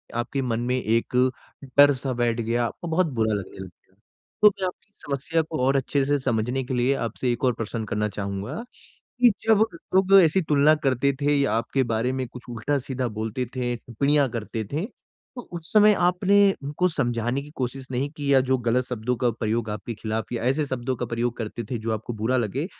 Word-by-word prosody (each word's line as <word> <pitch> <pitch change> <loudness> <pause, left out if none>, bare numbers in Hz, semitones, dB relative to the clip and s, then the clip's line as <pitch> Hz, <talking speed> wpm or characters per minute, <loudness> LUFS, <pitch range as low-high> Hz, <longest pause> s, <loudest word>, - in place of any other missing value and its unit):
आपके 120 +3 -2
मन 115 -3 -1
में 125 +1 0
एक 115 0 0 0.6
डर 145 0 +8
सा 130 0 -3
बैठ 120 -1 0
गया, 120 +1 0
आपको 170 +9 -6
बहुत 165 +2 +2
बुरा 110 -2 +1
लगने 100 -2 -5
लग 95 - -6 0.2
गया। 95 - -33 0.5
तो - - +11
मैं 195 -1 -4
आपकी 205 +3 -10
समस्या 145 +4 0
को 155 0 -5
और 135 +1 +3
अच्छे 135 +1 0
से 145 +1 +1
समझने 125 +1 -1
के 130 - -5
लिए 125 +2 +2
आपसे 125 +2 -2
एक 120 - -7
और 125 - +3
प्रश्न 115 0 -4
करना 105 +1 0
चाहूँगा 100 - -4 0.6
कि, 245 -2 +7
जब 220 -1 +5 0.3
लोग 190 +1 +4
ऐसी 170 +3 +3
तुलना 150 +1 +5
करते 135 +1 +2
थे 145 +1 +3
या 140 -6 +1
आपके 115 +4 0
बारे 120 +4 0
में 130 - -2
कुछ 125 +1 -11
उल्टा-सीधा 130 +2 -2
बोलते 110 +3 -2
थे, 120 -1 -1
टिप्पणियाँ 140 +5 +1
करते 115 -1 -4
थे 155 +5 -1 0.5
तो 245 - -5
उस 170 -2 -6
समय 210 0 +6
आपने, 195 +3 +4
उनको 150 +6 0
समझाने 120 -4 -1
की 145 - -12
कोशिश 130 +1 -3
नहीं 135 +3 -1
की 145 -1 0
या 135 - +6
जो 130 - +5
गलत 120 +1 +1
शब्दों 125 0 -2
का 120 - +4
प्रयोग 110 0 -2
आपके 105 +2 -5
खिलाफ़ 110 +1 -4
या 115 - -3
ऐसे 135 +5 +1
शब्दों 130 -1 -3
का 125 - -3
प्रयोग 120 +1 -2
करते 115 +1 -5
थे 120 - -2
जो 110 +1 -3
आपको 110 +2 -5
बुरा 125 +4 +2
लगे, 125 - -1
125 Hz, 205 wpm, -24 LUFS, 115-145 Hz, 0.6 s, तो